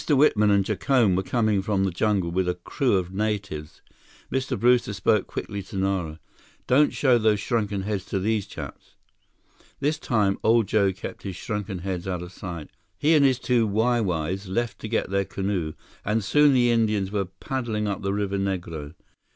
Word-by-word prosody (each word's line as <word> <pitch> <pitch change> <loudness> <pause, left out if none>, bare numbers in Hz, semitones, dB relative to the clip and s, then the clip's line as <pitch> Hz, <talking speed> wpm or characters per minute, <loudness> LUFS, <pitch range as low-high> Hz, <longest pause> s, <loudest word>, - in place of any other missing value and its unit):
Whitman 130 -8 +4
and 100 -1 +3
Jacome 120 -8 +2
were 95 - +1
coming 110 0 +1
from 95 -1 0
the 95 - +1
jungle 95 -1 0
with 90 +1 0
a 90 - 0
crew 125 - -1
of 90 0 -3
natives. 100 -7 -3 0.5
Mr. 130 -4 -1
Brewster 120 -2 +3
spoke 100 +1 +1
quickly 100 -1 -5
to 95 +1 -8
Nara. 95 -5 -1 0.5
"Don't 145 +4 +4
show 125 -4 +3
those 110 -2 +3
shrunken 105 -3 -1
heads 100 -2 -2
to - - -2
these 105 +1 0
chaps!" - - -9 0.8
This 150 +3 0
time 105 -8 +1
old 115 0 +4
Joe 100 -2 +3
kept 95 - -8
his 95 -2 -5
shrunken 105 -1 -4
heads 95 -2 -3
out 90 -2 -2
of 90 - -9
sight. 85 -5 -7 0.3
He 150 +10 +3
and 150 -3 +5
his 130 -2 +4
two 120 -3 +1
Wai 115 +4 +2
Wais 90 0 -2
left 115 +5 -2
to - - -6
get 110 -3 -1
their 100 0 +2
canoe, 95 -4 -2 0.3
and 110 +1 0
soon 150 +5 +5
the 120 -1 +4
Indians 110 -4 +1
were 100 -2 0
paddling 110 +2 -3
up 100 - -2
the 95 - -1
Rio 100 0 0
Negro. 90 -6 -3
100 Hz, 185 wpm, -25 LUFS, 95-115 Hz, 0.8 s, and